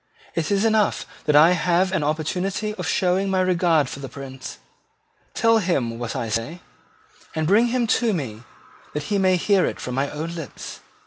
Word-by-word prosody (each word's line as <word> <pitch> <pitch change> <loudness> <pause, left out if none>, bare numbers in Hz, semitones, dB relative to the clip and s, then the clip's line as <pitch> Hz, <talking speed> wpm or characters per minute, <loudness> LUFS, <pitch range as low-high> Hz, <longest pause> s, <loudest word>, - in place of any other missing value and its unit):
"It 165 -2 -1
is 200 +1 +2
enough 220 -2 +2 0.2
that 150 - +3
I 155 +4 +8
have 180 +1 +2
an 190 -5 0
opportunity 180 +7 -1
of 180 -5 -5
showing 185 +3 +1
my 190 -1 +1
regard 175 -5 +2
for 135 - -7
the 135 -1 -7
Prince. 130 0 -8 0.8
Tell 230 0 +4
him 130 - -1
what 120 -2 -4
I 115 - -2
say; 115 +11 -3 0.7
and 160 -1 0
bring 210 +8 +4
him 240 0 +1 0.2
to 235 -2 +2
me 130 - -4 0.5
that 150 - -2
he 200 - +2
may 185 -1 +4
hear 190 +2 +3
it - - -2
from 125 - -5
my 135 +2 0
own 160 +3 -5
lips." 165 -5 -8
170 Hz, 185 wpm, -23 LUFS, 145-195 Hz, 0.8 s, I